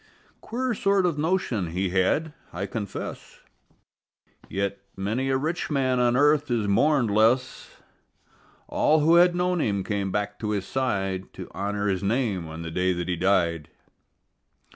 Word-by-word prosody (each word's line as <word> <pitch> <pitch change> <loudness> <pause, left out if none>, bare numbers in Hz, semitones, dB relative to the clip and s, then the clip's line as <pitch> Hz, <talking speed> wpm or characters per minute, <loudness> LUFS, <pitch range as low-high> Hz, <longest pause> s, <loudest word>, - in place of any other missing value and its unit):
Queer 250 +2 -2
sort 195 -2 +2
of 165 -4 0
notion 150 - 0
he 90 +3 -2
had, 120 - +1 0.2
I 95 +4 -4
confess, 105 -3 -6 1.1
Yet 100 0 -2 0.2
many 110 +8 -1
a 135 - +2
rich 160 +6 -2
man 130 -4 +1
on 120 0 +3
earth 145 0 +3
is 115 -4 0
mourned 135 +2 +3
less. 115 +5 +1 0.9
All 155 0 +2
who 160 +3 +4
had 175 0 +5
known 180 -1 +1
him 100 -5 0
came 100 -2 -2
back 105 0 -2
to 105 - -3
his 100 -3 -1
side 95 -8 -2
To - - -8
honor 100 +1 -3
his 95 -3 0
name 100 -5 -1
on 80 +1 -7
the 80 - -6
day 90 +2 +1
that 85 0 -4
he 90 - +1
died. 85 -4 +1
110 Hz, 155 wpm, -25 LUFS, 95-145 Hz, 1.1 s, had